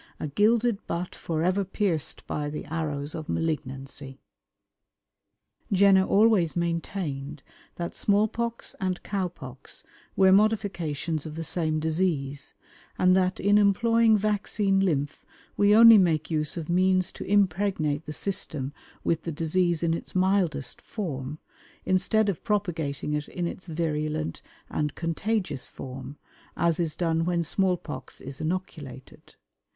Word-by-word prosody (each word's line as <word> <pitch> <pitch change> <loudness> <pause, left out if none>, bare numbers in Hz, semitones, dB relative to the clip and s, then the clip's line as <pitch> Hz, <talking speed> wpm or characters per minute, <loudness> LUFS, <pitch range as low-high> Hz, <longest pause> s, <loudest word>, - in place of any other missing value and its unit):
A - - -3
gilded 220 - +2
butt 175 +1 -3
forever 175 +4 0
pierced 185 -5 -1
by 145 -1 -3
the 150 - -6
arrows 150 -2 -3
of 155 -1 -6
malignancy." 135 -3 -3 1.5
Jenner 195 -1 +5
always 200 -6 +3
maintained 165 -4 -3 0.3
that 170 0 -4
small 205 +1 +2
pox 235 +1 -4
and 185 -3 -2
cow 195 -3 -1
pox 175 - -9 0.3
were 190 -1 +5
modifications 175 -7 +1
of 155 - -7
the 165 - -4
same 155 -1 0
disease, 155 -4 -1 0.4
and 185 0 +4
that 185 0 +1
in 205 +1 +4
employing 225 +2 +4
vaccine 205 -1 +1
lymph 155 -6 0 0.3
we 205 +1 +5
only 230 -1 +10
make 165 -4 +1
use 155 +1 -1
of 160 -2 -4
means 185 +1 +2
to - - -7
impregnate 185 -6 +1
the 150 - -6
system 150 -6 -2 0.3
with 165 - +1
the 165 - -4
disease 170 +2 0
in 165 -1 +2
its 165 - -6
mildest 185 -8 +1
form, 150 - -5 0.5
instead 200 +3 +2
of 195 -5 -2
propagating 165 -9 -1
it 150 0 -2
in 175 - -4
its 185 +2 -6
virulent 155 - -2 0.3
and 150 -1 -2
contagious 170 - -2
form, 135 +2 -8 0.4
as 170 -1 +2
is 160 -3 0
done 165 -1 +1
when 170 0 0
small 185 +3 +1
pox - - -8
is 135 0 -8
inoculated. 155 -6 -6
170 Hz, 135 wpm, -27 LUFS, 150-195 Hz, 1.5 s, only